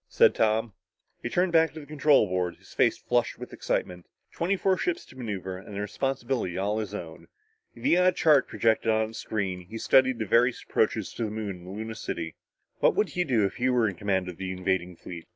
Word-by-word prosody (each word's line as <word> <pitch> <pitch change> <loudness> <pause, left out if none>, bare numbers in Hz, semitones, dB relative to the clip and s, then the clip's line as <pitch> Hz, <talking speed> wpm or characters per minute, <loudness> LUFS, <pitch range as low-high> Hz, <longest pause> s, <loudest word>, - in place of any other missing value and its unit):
said - - +5
Tom. 110 0 +1 0.5
He 120 - -3
turned 180 +6 +1
back 165 -2 +4
to 160 - -7
the 150 - -10
control 145 -3 +4
board, 90 -2 -1
his - - -18
face - - +3
flushed - - 0
with - - -9
excitement. 90 -1 -3 0.2
Twenty 180 +4 0
four 190 0 +2
ships 175 -1 -2
to - - -17
maneuver 95 -7 -5
and 100 +1 -10
the - - -3
responsibility 125 -3 -2
all 105 +3 0
his 105 -2 -4
own. 85 -3 -8 0.5
Via 175 +10 +3
a - - +6
chart 150 -6 +4
projected 115 0 +1
on 110 0 +1
a - - -15
screen, 95 -6 -3
he 115 - -7
studied 130 +2 +4
various 120 +4 +3
approaches - - 0
to 115 - -2
the - - -3
Moon 105 -1 -4
and 90 0 -14
Luna 110 +1 -4
City. 85 -7 -5 0.4
What - - +4
would - - +2
he 180 - 0
do 120 - +2
if 95 - -3
he 130 +1 +1
were 120 -3 +3
in 100 - -2
command 95 -1 -1
of 90 -2 -7
the 95 -1 -4
invading 90 -1 -1
fleet? 85 0 -9
110 Hz, 215 wpm, -27 LUFS, 95-130 Hz, 0.5 s, a